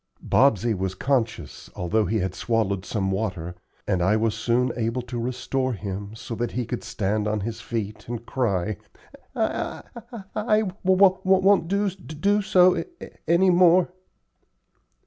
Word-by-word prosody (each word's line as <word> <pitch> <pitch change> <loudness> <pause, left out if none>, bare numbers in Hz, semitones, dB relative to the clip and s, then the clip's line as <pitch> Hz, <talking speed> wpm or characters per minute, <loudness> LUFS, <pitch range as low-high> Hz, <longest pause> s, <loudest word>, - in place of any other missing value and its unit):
Bobsey 120 -3 +3
was 95 -1 -3
conscious, 115 - -2
although 105 +5 0
he 110 +2 0
had 95 - -2
swallowed 100 -5 -1
some 95 0 -1
water, 95 -4 -3 0.3
and 95 -3 +1
I 100 +5 +3
was 110 0 +1
soon 120 +3 +1
able 115 +1 -2
to 120 0 -5
restore 130 +2 -2
him, 100 0 -6
so 115 +2 -7
that 120 0 -2
he 125 -1 -2
could 120 +1 -5
stand 105 -2 -1
on 105 -1 -1
his 115 +2 -5
feet 110 -3 -5
and 120 0 -5
cry: 105 -7 -1 0.6
"I - - -2 0.3
I 235 -4 -7
I 215 0 +2
w 200 -4 -2
won't 190 -1 +4
d 200 +3 +1
do 190 +3 -1
so 185 -2 +5
any - - -3 0.4
any 170 +4 +4
more." 180 0 +5
115 Hz, 150 wpm, -24 LUFS, 105-170 Hz, 0.6 s, so